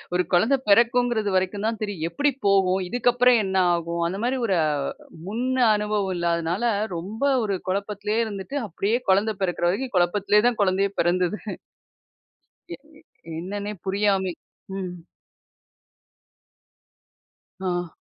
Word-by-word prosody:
ஒரு 180 - +3
கொழந்த 220 +10 +4
பெறக்குங்கிறது 235 0 +3
வரைக்கும் 190 +3 0
தான் 225 -1 -2
தெரியும். 200 -7 -3
எப்டி 285 +10 +1 0.2
போகும்? 190 -1 +3
இதுக்கப்புறம் 245 +1 +3
என்ன 190 -1 -3 0.2
ஆகும்? 170 0 -2
அந்த 190 +3 -4
மாரி 260 +1 0
ஒரு 190 -3 +2 0.7
முன் 225 +5 -2 0.2
அ - - +5
அனுபவம் 210 -2 -1
இல்லாதனால 170 +4 -1 0.3
ரொம்ப 200 +9 -7 0.2
ஒரு 200 -3 -1
குழப்பத்துலயே 205 +3 -1
இருந்துட்டு, 210 +7 -5
அப்டியே 205 +7 -1
கொழந்த 205 +3 +3
பெறக்குற 175 -1 0
வரைக்கும் 245 +5 -3
கொழப்பத்லயே 205 +4 +3
தான் 235 -3 -2
குழந்தையே 195 +1 +2
பெறந்தது. 180 +3 +1 1.3
எ - - -4 0.2
எ - - -19 0.4
என்னன்னே 200 +4 -4
புரியாமி 195 -1 +1 0.5
ம். 185 -2 -4 2.7
ஆ. 175 -2 -2
200 Hz, 120 wpm, -24 LUFS, 185-220 Hz, 2.7 s, அ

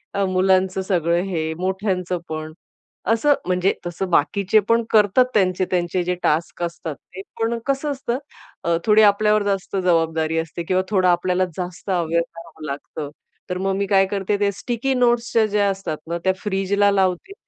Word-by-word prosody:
अ, 200 - +1
मुलांचं 185 0 +2
सगळं 175 -3 +1
हे, 160 -4 -2
मोठ्यांचं 185 -1 -1
पण. 155 0 -5 0.6
असं 260 +6 +4
म्हणजे 180 +1 +2
तसं 175 +2 -3
बाकीचे 200 +6 +3
पण 230 0 +4
करतात, 215 +3 +5
त्यांचे, 185 -2 +2
त्यांचे 180 0 0
जे 180 +1 -1
टास्क 165 +3 0
असतात, 170 -2 -4
ते 190 - -12 0.2
पण 230 +1 0
कसं 275 +2 0
असतं. 260 -3 -2 0.5
अ, 170 0 +1
थोडी 215 0 +5
आपल्यावर 210 0 +4
जास्त 195 -1 -2
जबाबदारी 165 -3 +1
असते 165 +1 -5
किंवा 185 +2 +1
थोडं 190 -3 +2
आपल्याला 180 +1 +2
जास्त 180 +1 -6
अवेअर 170 -2 +1
रहावं 165 -2 -11
लागतं. 145 +1 -6 0.4
तर 180 - -2
मग 190 +1 -1
मी 200 +1 0
काय 195 0 +4
करते, 200 +1 -1
ते 205 -1 +2
स्टिकी 245 +6 -2
नोट्सच्या 240 -2 +2
ज्या 205 -1 +1
असतात 195 -5 -3
ना 170 - -1
त्या 190 - +3
फ्रिजला 200 0 +2
लावते. 190 - 0
190 Hz, 165 wpm, -21 LUFS, 175-205 Hz, 0.6 s, करतात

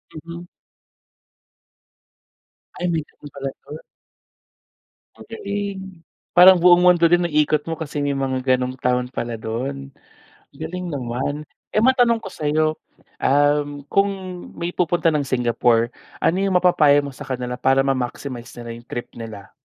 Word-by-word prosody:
Mhm. 170 +2 -9 2.3
Ay 180 - -3
may 165 -2 0
ganun 145 - -14
pala 135 -1 -4 0.2
yun. 150 - -8 1.4
Magaling. 200 -4 -6 0.3
Parang 185 +1 +10
buong 175 0 +7
mundo 180 -1 +5
din 175 0 +3
naikot 150 -2 +1
mo 165 - -2
kasi 155 -2 -5
may 145 0 0
mga 130 -1 +1
ganong 125 0 -3
town 125 0 0
pala 120 -3 -4
do'n, 130 +5 -5 0.6
galing 180 +3 -6
naman. 140 +2 -3 0.2
Eh - - 0
matanong 240 0 +4
ko 210 - -8
sa 150 -5 -3
'yo, 155 +1 +2 0.5
um, 145 0 +2
kung 200 +4 +2 0.5
may 170 +1 -3
pupunta 175 -1 +1
ng 150 - +1
Singapore 120 -2 +1 0.2
ano 170 - +1
yung 190 -2 +3
mapapayo 150 -5 +4
mo 140 - -8
sa 145 - -9
kanila 125 -3 -4
para 135 +2 +2
ma-maximize 130 -1 -3
nila 115 -1 -7
yung 120 0 -12
trip 120 - -5
nila? 110 -4 -9
145 Hz, 135 wpm, -21 LUFS, 130-175 Hz, 2.3 s, Parang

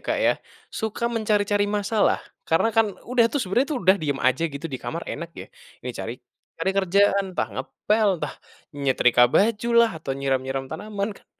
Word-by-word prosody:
Kak, - - -1
ya. - - +4 0.4
Suka 220 +1 -3
mencari-cari 205 -2 +1
masalah. 210 +1 +1 0.3
Karena, 165 +7 +3
kan, 225 0 +4 0.2
udah 245 -2 +4
tuh, 285 - -1
sebenarnya, 240 - +1
tuh, - - -1
udah 190 +2 +6
diam 145 -3 -1
aja, 130 +5 +2
gitu, 140 +1 -9
di 135 -5 -5
kamar, 170 +1 -5
enak 170 0 -6
ya. - - -8 0.4
Ini - - -2
cari, - - -5 0.4
cari 190 - +1
kerjaan, 200 +1 +3
entah 110 - 0
ngepel, 210 - 0
entah - - -4 0.4
nyetrika 130 -3 +3
baju 220 - +2
lah 235 -1 +6
atau 135 - -3
nyiram-nyiram 135 -1 -1
tanaman, 205 0 -3
kan. - - -21
200 Hz, 175 wpm, -24 LUFS, 140-215 Hz, 0.4 s, udah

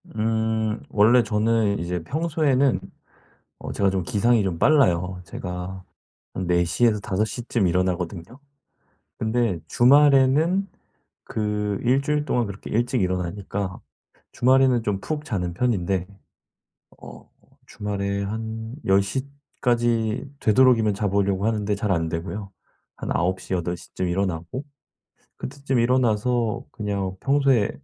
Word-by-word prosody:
음. 110 0 0
원래 115 +4 +5
저는 110 -1 +1
이제 85 0 -3
평소에는 140 - +1 0.8
어 - - -7
제가 100 -1 +2
좀 95 -1 -1
기상이 115 +4 +2
좀 90 -4 -2
빨라요. 90 - +3
제가 90 +1 -6 0.5
한 95 - -3
4 85 0 +3
시에서 105 +5 +2
5 100 +1 0
시쯤 115 -2 -1
일어나거든요. 90 0 -1 1.0
근데 110 -4 0
주말에는 145 +7 +4 0.6
그 105 -2 -2
1 130 +3 +3
주일 150 +1 0
동안 120 -5 0
그렇게 100 0 -8
일찍 120 +2 0
일어나니까 95 +1 -3 0.5
주말에는 130 -1 +3
좀 105 -3 -1
푹 150 +4 -4
자는 90 - -3
편인데 95 -5 0 1.0
어 - - -12 0.4
주말에 100 -1 -3
한 110 +2 -5
10 95 +1 +4
시까지 120 -1 -1
되도록이면 115 -2 +4
자 100 +1 -1
보려고 100 0 +1
하는데 105 -2 0
잘 100 0 -1
안 85 -2 0
되고요. 90 +5 -5 0.5
한 - - -5
9 95 +2 0
시, - - -7
8 90 -1 -1
시쯤에 90 +1 -5
일어나고 90 - -2 0.7
그때쯤 135 -1 -2
일어나서 120 -1 +1
그냥 100 -3 -3
평소에 135 -6 +2
105 Hz, 245 characters per minute, -24 LUFS, 95-125 Hz, 1.0 s, 원래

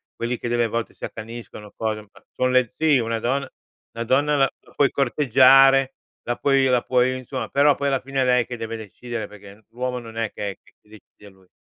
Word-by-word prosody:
quelli 120 +1 -3
che - - -4
delle 120 -1 +1
volte 115 +1 -3
si - - -19
accaniscono, 110 -2 -9
cose 110 -1 -2
ma - - -20
son 130 0 0
le 125 -2 +2
sì 155 -3 +3
una 115 0 -2
donna 135 +5 -1 0.4
la 115 0 -4
donna 145 +5 +2
la 135 -1 +3
la - - -22
puoi 140 -3 +3
corteggiare, 135 0 +5 0.3
la 120 - -2
puoi 135 -1 +2
la 125 -2 +3
puoi 130 0 +1
insomma, 130 +1 -5
però 140 0 +4
poi 140 - -2
alla 135 -2 +1
fine 135 0 -2
è - - +2
lei 125 -2 +3
che 125 - -6
deve 115 0 -5
decidere 115 +2 -7
perché 105 +1 -15
l'uomo 125 +2 -3
non 115 -1 -11
è 115 -2 -2
che 100 -1 -4
è - - -13 0.3
decide 105 -1 -17
lui. 95 -1 -25
125 Hz, 210 wpm, -23 LUFS, 115-135 Hz, 0.4 s, corteggiare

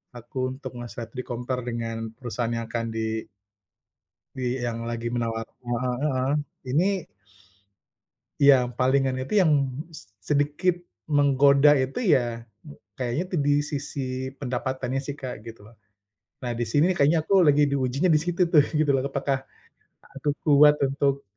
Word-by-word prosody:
aku 130 +2 -4
untuk 130 -2 -8
ngeset, 120 -1 -7
di-compare 125 0 -4
dengan 115 -1 -4
perusahaan 120 -1 -3
yang 115 -1 -3
akan 115 -1 -2
di 110 0 -2 1.1
Di - - -4 0.2
yang 115 -1 -3
lagi 115 0 -4
menawar 115 -1 -2 0.2
heeh 120 +1 -1
heeh, 130 -3 0 0.4
ini 150 +7 +3 1.6
iya 140 -1 +8 0.2
palingan 130 0 +2
itu 130 - -5
yang 165 -4 +4 0.4
s 95 -11 -12 0.2
sedikit 150 +5 +2 0.4
menggoda 140 0 +5
itu 130 +1 -4 0.2
ya, 130 - +3 0.7
kayaknya 125 +5 -2
itu 180 - -4
di 145 - +3 0.2
sisi 145 0 -4 0.4
pendapatannya 130 0 -2
sih, 145 0 -5
Kak, 130 -2 -5
gitu 115 0 -9
loh. 115 - -17 0.7
Nah, 120 - -2
di 120 - 0
sini 150 +2 +4
kayaknya 155 0 +3
aku 195 +3 +4
lagi 145 0 +5
diujinya 135 +5 +1
di 155 - +5
situ 175 +2 -2
tuh 150 - +7 0.2
gitu 155 -2 +3
loh. 135 - +2
Apakah 135 0 -1 0.8
aku 145 - -1 0.2
kuat 150 0 +7
untuk, 140 0 0
130 Hz, 140 wpm, -25 LUFS, 120-145 Hz, 1.6 s, iya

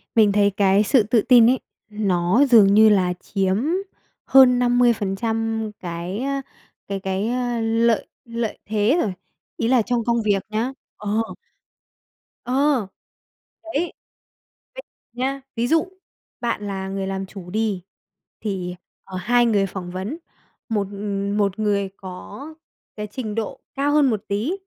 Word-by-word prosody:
Mình 215 -3 +5
thấy 200 0 +4
cái 200 +1 +3
sự 225 +2 +4
tự 220 +2 +2
tin 240 0 +6
ấy, 260 0 +2 0.3
nó 200 +3 +2
dường 210 -5 +7
như 220 +1 +7
là 185 -4 +3
chiếm 190 -1 0 0.7
hơn 255 -2 +6
50% 225 -2 +1
cái, 175 +2 -5
ơ, 275 0 -1 0.5
cái 195 -1 -3
cái 195 +3 -2 0.3
lợi 225 0 +2 0.2
lợi 230 -2 -3
thế 215 +7 +2
rồi, 200 - -1 0.4
ý 230 - 0
là 250 -1 +4
trong 235 +1 -1
công 235 -1 +1
việc 205 -3 +1
nhá, 220 +4 -1 0.3
ờ. 210 +2 -1 1.2
Ờ. 260 -3 +2 0.8
Đấy. 330 +1 -2 0.8
Ví - - -6 0.3
nhá, 265 +3 -2
ví 235 +1 0
dụ 325 +5 +2 0.5
bạn 230 -4 -2
là 190 -1 -4
người 195 0 -3
làm 195 0 -3
chủ 190 -2 -10
đi 210 -2 -1 0.6
thì, 185 -4 -3 0.3
ờ, 190 -1 -7
hai 240 +6 +3
người 205 -4 +2
phỏng 180 -2 -6
vấn, 190 - -4 0.5
một, 205 -3 0
ừm, 200 0 -3
một 200 0 0
người 200 -2 +1
có 190 +9 -9 0.5
cái 210 0 -4
trình 215 -1 -5
độ 225 -2 -3 0.2
cao 280 +1 +1
hơn 295 -3 +4
một 215 -4 -1
tí, 210 - -1
215 Hz, 145 wpm, -22 LUFS, 195-240 Hz, 1.2 s, dường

